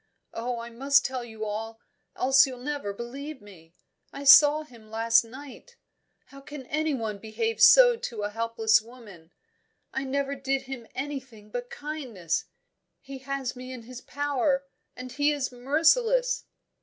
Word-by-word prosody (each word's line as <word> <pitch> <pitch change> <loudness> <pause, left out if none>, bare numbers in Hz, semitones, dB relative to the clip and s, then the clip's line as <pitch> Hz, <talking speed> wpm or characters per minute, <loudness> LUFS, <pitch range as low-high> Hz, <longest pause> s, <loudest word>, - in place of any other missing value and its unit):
Oh, 240 +1 -3
I 235 0 -7
must 275 +3 +3
tell 255 -2 -3
you 220 -2 -7
all, 225 +2 -5 0.4
else 270 +2 +5
you'll 255 -1 -7
never 285 -7 -3
believe 265 +7 -7
me 175 -6 -17 0.4
I 280 - -8
saw 295 +2 +8
him 235 -7 -17
last 230 +2 +3
night. 275 - -12 0.5
How 275 0 -13
can 275 -1 -9
anyone 265 -9 -2
behave 450 - -3
so - - +8
to 230 - -6
a 205 - -2
helpless 225 0 +2
woman? 215 -8 -15 0.6
I 265 - -2
never 280 +1 -1
did 270 0 -2
him 255 -4 -8
anything 260 -7 -7
but 245 +1 -5
kindness. 255 - -4 0.5
He 270 0 -10
has 270 -1 -4
me 255 +1 -9
in 250 -3 -8
his 250 +1 -10
power, 280 -1 -1 0.3
and 255 0 -8
he 290 +2 +2
is 280 -3 -2
merciless." 340 - +2
260 Hz, 150 wpm, -27 LUFS, 230-280 Hz, 0.6 s, saw